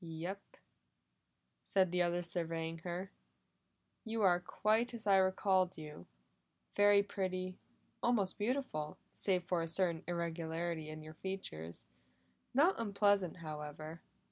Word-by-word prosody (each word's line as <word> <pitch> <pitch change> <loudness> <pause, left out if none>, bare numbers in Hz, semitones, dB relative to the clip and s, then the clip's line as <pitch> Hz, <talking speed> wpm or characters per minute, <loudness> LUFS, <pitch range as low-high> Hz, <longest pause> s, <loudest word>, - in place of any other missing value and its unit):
"Yes," 165 +4 -4 1.3
said 185 -3 +3
the 180 0 +2
other 175 0 +1
surveying 165 -1 -2
her. 180 +3 -4 0.9
"You 225 -1 -1
are 180 -2 +5
quite 220 +6 +1
as 225 - -7
I 195 -1 +6
recalled 190 -1 +3
you. 150 - -9 0.7
Very 205 0 +6
pretty, 185 -2 -3 0.4
almost 220 -6 +2
beautiful, 210 - -1 0.2
save 185 -3 +1
for 175 -1 0
a 165 - -2
certain 170 0 +1
irregularity 170 -1 -2
in 155 0 -7
your 155 0 -9
features. 85 - -5 0.7
Not 300 +7 +4
unpleasant, 200 -5 +2
however." 155 +1 -6
180 Hz, 115 wpm, -36 LUFS, 165-200 Hz, 1.3 s, I